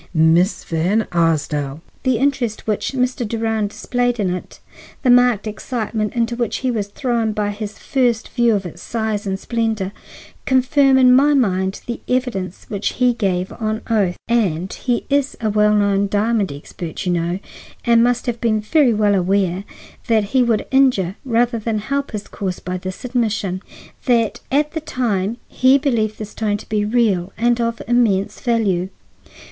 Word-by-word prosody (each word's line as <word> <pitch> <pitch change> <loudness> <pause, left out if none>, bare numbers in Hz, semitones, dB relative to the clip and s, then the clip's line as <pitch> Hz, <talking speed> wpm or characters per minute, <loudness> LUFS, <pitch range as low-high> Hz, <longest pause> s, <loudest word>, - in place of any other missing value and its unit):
"Miss 165 +5 +3
Van 180 +7 0
Arsdale!" 150 -4 0 0.2
"The 255 -3 +1
interest 255 -4 0
which 215 +4 -1
Mr. 250 -1 0
Durand 225 -1 -1
displayed 245 +2 -1
in 190 -3 +1
it, 180 - -7 0.4
the 255 - +5
marked 245 -4 +4
excitement 215 0 -3
into 235 0 0
which 235 -2 -1
he 255 - +2
was 210 -4 -2
thrown 230 0 -1
by 210 -1 -1
his 205 0 -6
first 245 -5 0
view 235 -3 +2
of 195 -2 -2
its 170 0 -8
size 220 -2 -2
and 190 0 -2
splendor, 220 -5 -1 0.6
confirm 265 +1 +4
in 255 -1 +6
my 290 +3 +5
mind 190 -6 +1
the 235 - -4
evidence 235 -8 -2
which 205 -1 -2
he 250 -1 +2
gave 185 -5 -1
on 220 -1 -3
oath 195 -5 +1
(and 190 -7 0
he 245 -2 -2
is 280 -1 +1
a 220 -2 0
well 210 0 +3
known 200 -1 +2
diamond 210 -1 +1
expert, 160 +5 -7
you 180 - +1
know, 170 +1 -1 0.5
and 235 -1 +5
must 245 0 +1
have 235 -2 -3
been 220 -2 +2
very 245 +2 +3
well 210 -1 +3
aware 190 0 +1 0.4
that 225 -3 +3
he 260 - +5
would 235 -3 +1
injure 250 -9 +3
rather 240 -2 +1
than 220 0 -2
help 275 +6 -2
his 210 -1 -6
cause 185 -3 -4
by 180 +1 -4
this 185 +6 -6
admission) 220 -7 -1 0.5
that 230 -3 +2
at 295 +2 +2
that 315 -1 -6
time 220 -3 -1
he 260 +2 +4
believed 230 -6 0
the 215 - -5
stone 210 0 -2
to - - -13
be 210 -1 +1
real 210 -5 +1
and 240 +2 +2
of 230 0 -2
immense 210 -4 +2
value. 205 -7 0
220 Hz, 170 wpm, -19 LUFS, 195-245 Hz, 0.6 s, in